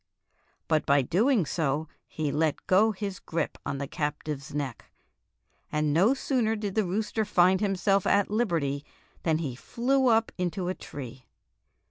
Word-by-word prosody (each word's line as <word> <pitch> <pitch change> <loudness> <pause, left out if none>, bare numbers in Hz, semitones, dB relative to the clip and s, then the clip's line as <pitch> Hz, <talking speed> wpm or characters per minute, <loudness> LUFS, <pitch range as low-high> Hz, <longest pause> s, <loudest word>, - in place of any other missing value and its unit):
But 155 -2 +2
by 140 0 +5
so - - -5
doing 215 - +3 0.6
he 155 -2 -2
let 155 -1 0
go 210 +4 +4
his 200 -2 -5
grip 165 -1 -3
on 140 -1 -2
the 140 - -3
captive's 150 0 -4
neck, 140 -5 -4 0.9
and 150 -1 +1
no 200 - +4
sooner 245 -5 0
did 205 -2 -3
the 215 -1 +1
rooster 215 +4 -1
find 185 -1 +3
himself 195 -1 +1
at 200 0 +3
liberty 165 -11 0 0.4
than 160 -2 +1
he 145 -7 -3
flew 260 - +1
up 225 -1 +3
into 180 0 -1
a - - 0
tree. 130 -6 -9
180 Hz, 150 wpm, -28 LUFS, 150-215 Hz, 0.9 s, by